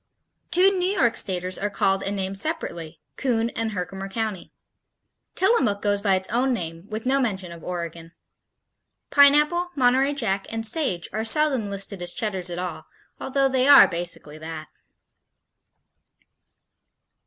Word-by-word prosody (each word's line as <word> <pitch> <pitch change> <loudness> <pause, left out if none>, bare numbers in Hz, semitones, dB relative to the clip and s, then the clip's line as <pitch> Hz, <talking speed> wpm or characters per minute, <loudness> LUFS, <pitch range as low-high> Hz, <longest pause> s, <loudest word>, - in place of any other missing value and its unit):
Two 375 +3 +5
New 360 - +1
York 265 - +1
Staters 185 -1 0
are 205 - -1
called 195 -1 0
and 200 +1 -3
named 195 0 -3
separately, 195 - -3 0.2
Coon 235 -3 0
and 225 -1 -3
Herkimer 195 +1 -5
County. 215 -3 -4 0.8
Tillamook 355 - +2
goes 205 -1 0
by 200 -2 +2
its 190 0 -2
own 250 +4 +1
name 165 -1 -7
with 215 +2 -6
no 270 +2 +2
mention 190 -8 -3
of 170 -1 -11
Oregon. 170 -2 -6 1.0
Pineapple, 300 +5 +4
Monterey 265 +2 +2
Jack 195 -7 -2
and 225 0 -4
Sage 220 - 0
are 220 +2 -2
seldom 260 -3 +2
listed 195 -1 -2
as 175 0 +1
Cheddars 190 -5 -2
at 175 - -5
all, 180 0 -6 0.3
although 275 +1 0
they 260 0 +1
are 285 -1 +9
basically 170 -3 -6
that. 155 -1 -8
205 Hz, 140 wpm, -23 LUFS, 185-265 Hz, 1.0 s, are